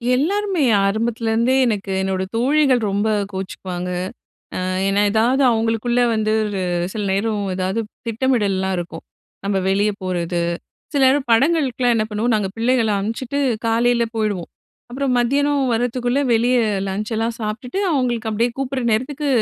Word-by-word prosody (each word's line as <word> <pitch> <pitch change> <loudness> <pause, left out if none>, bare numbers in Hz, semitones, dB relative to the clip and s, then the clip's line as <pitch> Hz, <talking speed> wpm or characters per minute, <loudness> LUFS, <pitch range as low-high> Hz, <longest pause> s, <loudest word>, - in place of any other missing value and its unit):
எல்லாருமே. 380 +4 0 0.2
ஆரம்பத்துலருந்தே, 230 +3 +1
எனக்கு 205 -4 -1
என்னோட 190 -1 -1
தோழிகள் 260 0 +3
ரொம்ப 200 +2 0 0.3
கோச்சுக்குவாங்க. 185 -1 -5 0.7
அ - - -2 0.3
ஏன்னா 200 +1 +2
ஏதாவது 240 +6 +2
அவுங்களுக்குள்ள 225 +2 +1
வந்து, 215 -1 0
ஒரு 200 -2 -3 0.3
சில 215 - -3
நேரம் 205 +1 0
ஏதாவது 185 +3 -1 0.3
திட்டமிடல்லாம் 210 -6 0
இருக்கும். 170 -2 -6 0.4
நம்ப 200 0 0
வெளிய 200 +2 +2
போறது. 175 -1 -1 0.5
சில 285 - +1
நேரம் 270 -1 +2
படங்களுக்குலாம் 255 -2 +2
என்ன 215 - +1
பண்ணுவோம் 215 -1 +1
பிள்ளைகள 235 -1 +2
அனுப்ச்சுட்டு 235 +6 -3 0.3
காலைல 235 +1 +2
போயிடுவோம். 210 -5 -2 0.4
அப்றம் 265 +1 -1
மத்தியானம் 280 +2 +1
வர்றதுக்குள்ள, 245 +2 0 0.2
வெளிய 245 +3 +3 0.3
லஞ்ச்சலாம் 220 +4 -2
சாப்ட்டுட்டு 225 - -4
அவுங்களுக்கு 240 -5 0
அப்டியே 230 +3 +1
கூப்டுற 270 -1 -2
நேரத்துக்கு 275 +6 -1
230 Hz, 125 wpm, -20 LUFS, 205-255 Hz, 0.7 s, தோழிகள்